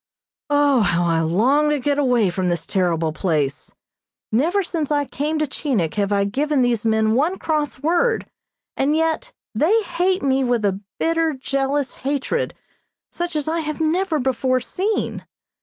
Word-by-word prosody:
O, 290 -2 +4
how 175 -3 +2
I 165 -1 +2
long 240 - +2
to 295 -1 +1
get 285 +2 0
away 245 -8 +2
from 180 0 -1
this 170 -2 -2
terrible 170 -4 0
place! 150 -4 -2 0.6
Never 335 - +2
since 325 -4 -3
I 290 -1 +1
came 300 +4 -2
to 305 - +1
Chinik 255 - -1
have 205 -1 -1
I 200 -1 +2
given 275 +6 +1
these 240 -2 +1
men 220 -1 +2
one 310 +10 +1
cross 295 -3 -2
word, 435 +9 +1 0.5
and 285 +3 +1
yet 325 +10 0 0.2
they 370 - +3
hate 370 0 0
me 270 -1 +2
with 240 -4 +1
a 195 0 0 0.2
bitter, 330 -1 +1
jealous 275 +1 -1
hatred, 285 - -2 0.6
such 345 -1 -4
as 300 -1 -1
I 330 +1 0
have 305 -1 -4
never 325 +2 +1
before 255 -1 +1
seen. 405 - -2
275 Hz, 160 wpm, -21 LUFS, 215-315 Hz, 0.6 s, O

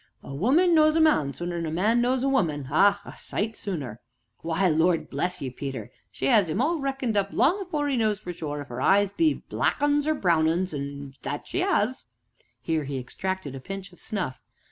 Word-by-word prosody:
"A 140 - -8
woman 280 - +3
knows 310 -1 +5
a - - +3
man 230 - +3
sooner 175 +4 -4
than 165 -1 -2
a - - -3
man 215 +8 +2
knows 250 +1 +1
a - - +2
woman 155 - 0
ah, 200 +6 +4
a - - -9
sight 220 +2 -3
sooner! 145 - -5 0.4
Why, 170 +3 0
Lord 165 +1 +2
bless 180 -4 -1
ye, 130 - -3
Peter, 130 -4 -6 0.2
she 135 - -3
'as 195 +1 +4
'im 155 - -1
all 315 +6 +1
reckoned 270 -5 -2
up 200 -1 +1
long 360 +9 +2
afore 305 -6 -2
'e 280 - 0
knows 215 -3 +1
for 180 -4 -6
sure 150 -3 -5
if 145 - -10
'er 120 - -4
eyes 200 0 +4
be 315 +7 +2
black - - 0
'uns 290 0 +2
or 310 - +2
brown 170 - +2
'uns 175 +2 0 0.5
that 145 +1 -4
she 365 - -2
'as." 260 - 0 0.6
Here 160 -3 -1
he 135 0 -4
extracted 185 +4 -4
a 135 - -6
pinch 195 +4 -7
of - - -18
snuff. 185 -11 -3
190 Hz, 210 wpm, -26 LUFS, -, 0.6 s, knows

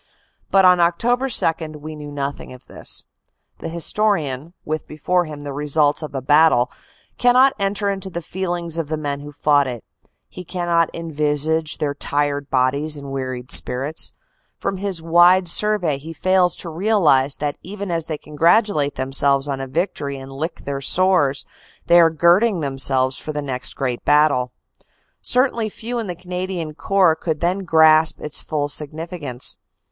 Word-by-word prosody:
But 195 -1 +4
on 180 -1 +6
Oct. 175 -2 +1
2 155 - -10
we 155 +1 -8
knew 150 -1 -9
nothing 140 -1 -5
of 125 0 -15
this. - - -5 0.5
The 165 - -5
historian, 170 -4 0
with 155 0 -4
before 175 +4 0
him 150 -2 -8
the 145 -1 -6
results 150 +1 +1
of 155 -2 -7
a 135 - -3
battle, 145 -3 +4 0.5
cannot 255 +2 +5
enter 200 +1 -1
into 195 -1 -3
the 170 -2 -6
feelings 175 -2 -4
of 160 - -3
the 155 +1 -3
men 145 -2 -3
who 145 +1 -10
fought 145 -1 +2
it; 120 -3 -6 0.4
he 180 - -10
cannot 175 -2 0
envisage 155 -1 -1
their 145 -2 -2
tired 145 0 -2
bodies 140 +4 +1
and 140 -1 -8
weary 130 -2 -4
spirits; 135 +5 +3 0.4
from 195 - -3
his 190 -4 -3
wide 175 +2 +5
survey 180 -6 0
he 160 +3 -9
fails 185 0 +2
to 170 - -7
realize 160 -7 +2
that 145 0 -3
even 200 0 -6
as 165 -2 -2
they 155 - -3
congratulate 155 0 +1
themselves 135 +1 +2
on 135 -1 -3
a 135 - -5
victory 140 -2 -3
and 135 0 -10
lick 155 +5 -6
their 140 -1 -4
sores, 160 -4 +2 0.4
they 175 0 +6
are 165 -1 +6
girding 175 +5 +3
themselves 135 -2 +1
for 155 - -6
the 150 - -3
next 130 -2 -5
great 125 -3 -3
battle. 145 -4 +3 0.7
Certainly 245 -3 +2
few 235 +3 -5
in 225 - -4
the 180 - -4
Canadian 180 -2 -5
Corps 180 +2 +2
could 160 -2 -3
then 180 +3 0
grasp 160 -3 +4
its 150 - -4
full 145 -2 -2
significance. 150 -2 -4
155 Hz, 160 wpm, -20 LUFS, 145-180 Hz, 0.7 s, on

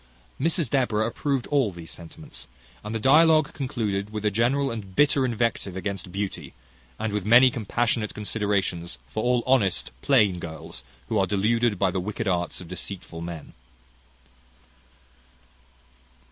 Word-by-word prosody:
Mrs 165 +1 +1
Deborah 115 -4 +1
approved 135 +3 -1
all 135 -8 +2
these 85 -3 -9
sentiments, 80 -6 -10 0.4
and 105 +2 -5
the - - 0
dialogue 155 +5 +5
concluded 105 -7 -2
with 105 0 -5
a 105 - +3
general 125 +6 +1
and 100 -5 -7
bitter 145 -2 +4
invective 115 -5 -1
against 95 -1 -4
beauty, 100 +1 -4 0.4
and 110 -2 -2
with 105 -2 -1
many 120 +5 +7
compassionate 115 -1 -1
considerations 100 - -1
for 110 +12 -4
all 120 0 +2
honest 95 - +2
plain 105 -10 +3
girls 80 -6 -7 0.3
who 110 - +1
are 95 - +2
deluded 110 +3 +1
by 95 0 +2
the 95 - -1
wicked 105 +3 -3
arts 90 -2 -1
of 90 - -9
deceitful 90 -1 -6
men. 85 -3 -7
105 Hz, 140 wpm, -25 LUFS, 95-120 Hz, 0.4 s, many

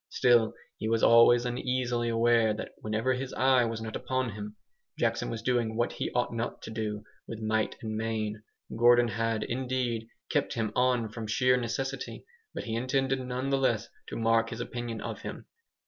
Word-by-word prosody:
Still 120 -3 +3 0.2
he 110 - -2
was 115 -1 +1
always 120 +1 +7
uneasily 125 -1 -1
aware 115 -1 +3
that - - -6
whenever 110 +4 0
his 130 +1 -4
eye 130 -2 +4
was 115 -1 -3
not 110 -1 -5
upon 130 -2 -1
him, 105 +1 -7 0.4
Jackson - - 0
was 115 -1 -5
doing 120 -3 +1
what 120 +1 +1
he - - -3
ought 120 -1 +1
not 115 +1 -4
to - - -7
do 105 -1 -3 0.2
with 115 - -6
might 110 0 0
and 110 -1 -3
main. 110 -1 -2 0.3
Gordon 120 +1 +5
had, 115 -1 -1
indeed, 125 -2 -2 0.2
kept - - 0
him 110 -2 -1
on 125 -3 +2
from 110 0 -6
sheer 125 +3 +3
necessity, 135 +2 -3 0.3
but - - -5
he 115 - -4
intended 135 +2 0
none 130 +1 -3
the 135 - +2
less 115 -6 +1 0.2
to - - -6
mark 115 0 +2
his 115 - -6
opinion 120 -2 -4
of - - -5
him. - - -7
115 Hz, 180 wpm, -29 LUFS, 110-125 Hz, 0.4 s, always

